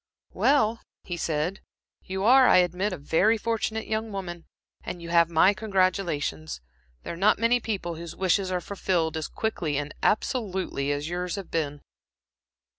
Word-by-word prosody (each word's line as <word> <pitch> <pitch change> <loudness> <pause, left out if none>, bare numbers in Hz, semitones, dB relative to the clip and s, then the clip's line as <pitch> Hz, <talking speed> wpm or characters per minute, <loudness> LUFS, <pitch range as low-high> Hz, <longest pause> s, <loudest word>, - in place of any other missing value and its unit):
"Well," 230 -5 +2 0.2
he 175 - -4
said 165 +2 -2 0.4
"you 190 +1 -4
are, 255 +3 +7
I - - +6
admit, 180 +3 +1
a 185 - -4
very 170 +10 +2
fortunate 220 0 -2
young 220 0 -2
woman, 175 -4 -6 0.4
and 175 - -6
you 170 0 -8
have 170 -1 +4
my 170 +4 +5
congratulations. 180 - -1 0.4
There - - -5
are - - -6
not 200 +5 +3
many 230 +2 +3
people 190 -8 -3
whose 170 -1 -8
wishes 190 0 +1
are 180 -1 -1
fulfilled, 175 -4 -1
as 160 -1 -3
quickly 165 -10 -2
and 145 +1 -3
absolutely 190 - 0
as 145 +1 -2
yours 180 +1 -3
have 195 -3 -7
been." 145 -3 -2
180 Hz, 160 wpm, -26 LUFS, 165-210 Hz, 0.4 s, are